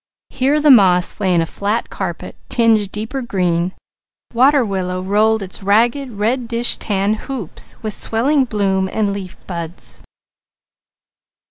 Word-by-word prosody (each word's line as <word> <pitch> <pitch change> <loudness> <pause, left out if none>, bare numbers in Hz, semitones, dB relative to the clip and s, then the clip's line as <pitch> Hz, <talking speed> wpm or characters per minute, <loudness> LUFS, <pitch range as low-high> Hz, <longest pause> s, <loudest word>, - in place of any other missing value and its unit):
Here 275 +3 +1
the 300 -1 +5
moss 185 -7 +4
lay 190 - +1
in 170 - +3
a - - 0
flat 205 +7 -3
carpet, 175 -4 -5
tinted 220 -4 +2
deeper 225 +6 -4
green. 180 -5 -1 0.6
Water 260 +2 +4
willow 185 -2 -3
rolled 215 +2 +2
its 190 +1 -7
ragged 235 +7 +2
reddish 235 +2 +1
tan 200 0 0
hoops, 220 - -6
with 215 -1 -2
swelling 265 +8 +1
bloom 195 -4 0
and 210 -2 0
leaf 190 -2 -7
buds. 170 -1 -6
210 Hz, 130 wpm, -18 LUFS, 190-235 Hz, 0.6 s, the